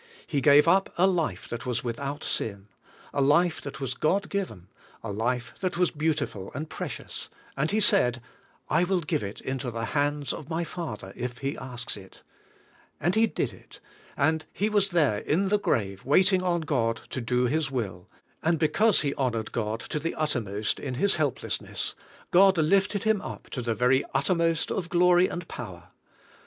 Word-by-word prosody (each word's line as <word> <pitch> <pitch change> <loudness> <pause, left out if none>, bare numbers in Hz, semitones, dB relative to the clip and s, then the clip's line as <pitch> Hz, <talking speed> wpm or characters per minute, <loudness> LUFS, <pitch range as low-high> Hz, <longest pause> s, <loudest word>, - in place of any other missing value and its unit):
He 145 -4 -1
gave 145 +3 +6
up 190 +3 +4
a 180 - +5
life 165 - 0
that 120 +2 -6
was 125 -3 -1
without 140 +5 -4
sin; 100 -1 -3 0.4
a, 140 - +1
life 160 +5 +3
that 140 - -7
was 135 -2 -2
God 190 +9 0
given; 180 - -4 0.4
a 115 - -4
life 120 +3 -1
that 185 -2 -2
was 180 -1 +2
beautiful 150 - -2
and 155 +4 -4
precious; - - -6 0.3
and 140 +3 0
He 215 - +1
said, 195 - +4 0.5
"I 170 - +3
will 180 0 +1
give 150 - -1
it 100 0 -6
into 130 -1 -3
the 115 -1 -3
hands 145 0 0
of 150 - -8
my 165 +1 -1
Father 150 - -6
if 125 0 -4
He 135 +2 -3
asks 125 -3 -5
it;" 95 -1 -14 0.8
and 175 +5 +1
He 225 +2 +4
did - - -2
it; - - -16 0.4
and 155 +2 +2
He 210 +2 0
was 205 -2 +3
there 150 - +2
in 190 - +1
the 210 +1 +3
grave 100 - -1
waiting 185 +7 +4
on 175 -2 +1
God 115 -7 0
to 130 - -3
do 125 +2 +1
His 150 +3 0
will; 100 -9 -4 0.3
and 165 +1 +2
because 205 +7 +3
He 140 -2 0
honored 115 -5 -1
God 110 -1 -2
to 150 - -3
the 165 +3 -3
uttermost 110 -9 -1
in 130 -3 -4
His 195 +9 +3
helplessness, 150 -4 -1 0.4
God 190 +1 +6
lifted 195 +5 +2
Him 220 -3 +2
up - - -8
to 125 - -3
the 115 -1 -1
very 125 +4 +3
uttermost 165 +1 +1
of 175 -3 -2
glory 180 +1 +5
and 170 -1 -6
power. 90 -8 -8
145 Hz, 180 wpm, -27 LUFS, 120-175 Hz, 0.8 s, gave